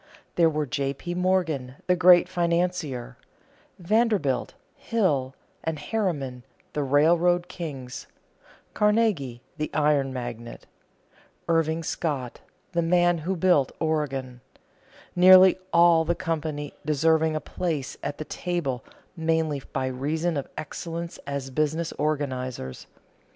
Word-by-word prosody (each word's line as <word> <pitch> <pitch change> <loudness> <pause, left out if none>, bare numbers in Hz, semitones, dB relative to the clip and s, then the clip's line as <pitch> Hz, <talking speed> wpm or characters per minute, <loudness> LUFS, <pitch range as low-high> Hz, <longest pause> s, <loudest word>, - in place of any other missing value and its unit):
There 165 -2 +4
were 155 -1 -1
J. 140 0 -2
P. 175 +5 -5
Morgan, 175 -8 0
the 180 - +3
great 180 0 +6
financier; 170 -8 -1 0.6
Vanderbilt, 190 - +1 0.2
Hill, 185 - 0 0.3
and 160 0 -2
Harriman, 145 - -2 0.3
the 150 - -1
railroad 170 +5 +3
kings; 135 -8 -7 0.7
Carnegie, 210 - +1
the 155 0 -2
iron 145 -3 +2
magnate; 120 -2 -7 0.8
Irving 165 0 +1
Scott, 140 -7 -3 0.3
"the 170 -1 +1
man 175 0 +3
who 180 +5 -2
built 170 -6 +3
the - - -1
Oregon" 135 -5 -2 0.7
nearly 185 +1 +8
all 170 -1 +5
the 170 +2 0
company 155 -4 -3
deserving 160 +1 +2
a - - 0
place 155 -6 -3
at 145 - -4
the 155 - -5
table 150 -10 -3 0.3
mainly 160 -3 0
by 135 -1 -1
reason 155 +6 -1
of 140 - -3
excellence 165 +2 -6
as 140 -1 -4
business 155 +4 -1
organizers. 130 - -3
155 Hz, 115 wpm, -26 LUFS, 135-175 Hz, 0.8 s, nearly